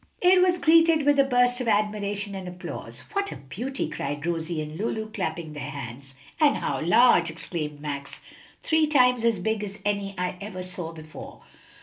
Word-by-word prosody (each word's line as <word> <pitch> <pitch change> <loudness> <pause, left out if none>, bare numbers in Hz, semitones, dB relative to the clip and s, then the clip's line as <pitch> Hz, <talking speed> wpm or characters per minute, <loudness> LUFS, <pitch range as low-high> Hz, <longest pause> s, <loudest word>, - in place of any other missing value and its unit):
It 360 0 +5
was 360 -1 +4
greeted 325 -2 +5
with 290 -1 +4
a - - +8
burst 245 -1 +2
of 250 - -3
admiration 205 -1 0
and 190 -2 -6
applause. 180 +1 -7
"What 400 -1 -1
a - - -6
beauty!" 240 - -4
cried 145 +2 -4
Rosie 165 -1 -2
and 155 0 -5
Lulu, 220 +2 -3
clapping 165 -5 -4
their 150 -1 -6
hands. 135 -1 -8 0.2
"And 300 -2 +5
how - - -2
large!" 175 0 +5
exclaimed 155 -2 -5
Max, 140 -2 -6 0.4
"three 315 -1 +3
times 250 -5 +4
as 230 -2 +3
big 210 +3 -1
as 200 0 -6
any 200 -1 -1
I 180 0 -2
ever 195 -3 -6
saw 180 -2 -5
before." 155 -1 -11
200 Hz, 180 wpm, -26 LUFS, 160-250 Hz, 0.4 s, a